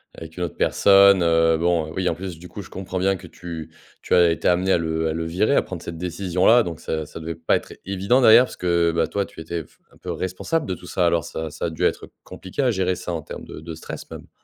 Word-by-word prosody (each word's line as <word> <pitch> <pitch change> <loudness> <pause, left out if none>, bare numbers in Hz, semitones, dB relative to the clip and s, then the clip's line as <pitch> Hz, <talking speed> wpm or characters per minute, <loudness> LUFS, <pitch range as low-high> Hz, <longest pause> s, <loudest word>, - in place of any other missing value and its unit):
avec 80 +1 -11
une 90 - -2
autre 85 - -4
personne, 100 -1 +5
heu, 80 -1 +3
bon, 85 -2 0
oui, 95 -1 -1
en - - -2
plus 90 -2 -7
du 90 - -11
coup, 100 - -8
je 90 - -13
comprends 95 -1 -6
bien 95 +1 +1
que 90 - -12
tu 80 -2 -8 0.3
tu - - +1
as 85 -1 +5
été 80 - -1
amenée 90 +2 +2
à - - +5
le 80 -1 -1
à - - -1
le 80 +1 -3
virer, 95 +11 +1
à - - +5
prendre 90 -3 -7
cette 85 -1 -6
décision-là. 90 +6 +2
Donc 85 -5 -6
ça 80 -1 -3
ça 75 - -10
devait 80 0 -5
pas 80 0 +1
être - - -10
évident 100 +7 +1
d'ailleurs, 120 +2 +8
parce - - -10
que 85 -2 +2
bah, 85 - +2
toi 100 -1 -1
tu - - -12
étais 85 +1 -4
f - - -26 0.2
un - - -20
peu - - -6
responsable 95 - -2
de 95 - -2
tout 90 0 -13
ça, 90 - 0
alors 85 -1 +1
ça 80 -1 -5
ça 80 - -4
a 85 - -1
dû 80 - -5
être - - 0
compliqué 95 +9 -6
à 125 - +3
gérer 95 -2 0
ça 90 - -6
en 80 - -3
terme - - -9
de - - -9
de 80 +1 -8
stress 80 - -9
même. - - -10
85 Hz, 275 wpm, -23 LUFS, 80-95 Hz, 0.3 s, d'ailleurs